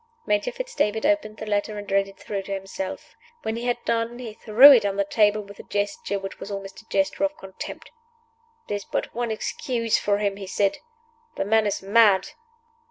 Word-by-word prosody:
Major 205 0 +1
Fitz - - -6
David 220 - 0
opened 295 -8 +1
the 215 - -6
letter 210 0 -1
and 205 -1 -7
read 195 0 +3
it 195 - -14
through 200 -2 -4
to 195 - -9
himself. 195 -1 -6 0.3
When 220 - -2
he 235 +1 -4
had 245 -1 +1
done 230 +1 0
he 240 -3 -7
threw 235 +6 +8
it 240 -6 +6
on 200 -1 -1
the 200 - +2
table 210 0 +2
with 200 0 -13
a - - -12
gesture 205 0 -2
which 195 0 -7
was - - -7
almost 195 0 -7
a 225 - -30
gesture 290 0 0
of 295 +1 0
contempt. 190 -1 -9 0.8
"There 205 - -1
is 200 - -8
but - - -3
one 240 0 -2
excuse 230 +1 -1
for 205 -1 +1
him," 200 -1 -1
he 195 -1 -7
said. 200 +1 0 0.6
"The - - -2
man 220 +1 +3
is 200 -1 -2
mad." 205 -1 +4
210 Hz, 210 wpm, -24 LUFS, 200-230 Hz, 0.8 s, threw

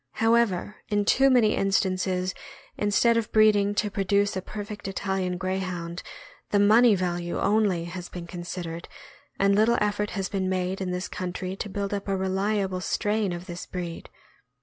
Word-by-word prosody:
However, 225 -3 +2
in 205 -1 +1
too 270 +6 +5
many 235 -5 +4
instances, 185 -1 0 0.4
instead 220 +3 +3
of 225 -2 -2
breeding 205 -2 +4
to 210 0 0
produce 200 +1 +1
a 190 - -2
perfect 205 +1 -7
Italian 190 -2 -2
Greyhound, 185 -2 -3 0.5
the 205 - +2
money 215 +2 +6
value 175 -2 -2
only 200 -5 +2
has 175 +1 -7
been 175 -1 -7
considered, 175 -1 -6 0.5
and 200 0 +4
little 225 +3 +4
effort 210 0 0
has 190 -1 -1
been 190 -2 -2
made 185 +1 -1
in 185 - -2
this 180 +1 -3
country 185 0 -4
to 205 - -5
build 200 0 -3
up 200 0 -3
a 195 -1 0
reliable 190 0 0
strain 205 +1 0
of 175 +1 -5
this 175 0 -7
breed. 175 -2 -6
195 Hz, 160 wpm, -26 LUFS, 180-205 Hz, 0.5 s, money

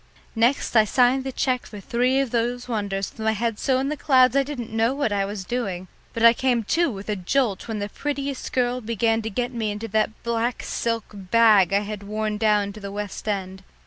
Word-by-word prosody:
Next 240 +3 +1
I 220 - +7
signed 250 +4 +3
the 265 - -4
cheque 255 -1 -1
for 210 - -9
three 250 +6 +1
of 270 -4 -1
those 245 +1 -1
wonders 200 -4 -2
with - - -22
my 220 0 +2
head 225 0 -2
so 265 -2 +1
in 270 +2 -1
the 300 - -1
clouds 260 -3 +4
I 275 - +5
didn't 265 -5 -5
know 225 +4 +1
what 280 -6 0
I 200 -1 +1
was 200 -1 -5
doing, 190 -6 -3 0.2
but 230 0 +1
I 230 - +9
came 245 -2 +1
to 335 +10 +1
with 200 -4 -7
a 210 - -1
jolt 205 +2 0
when 225 -2 -3
the 205 0 -3
prettiest 280 +3 -4
girl 250 0 0
began 225 0 0
to 220 - -4
get 245 +4 -2
me 225 -3 -2
into 210 +2 -4
that 215 +1 -1
black 235 +1 -1
silk 230 -2 -2
bag 205 -1 +4
I 200 +1 +3
had 210 0 -6
worn 210 +1 -3
down 210 -2 +2
to 215 - -10
the 200 -1 -7
West 205 +1 -6
End. 190 -2 -3
225 Hz, 225 wpm, -24 LUFS, 205-250 Hz, 0.2 s, I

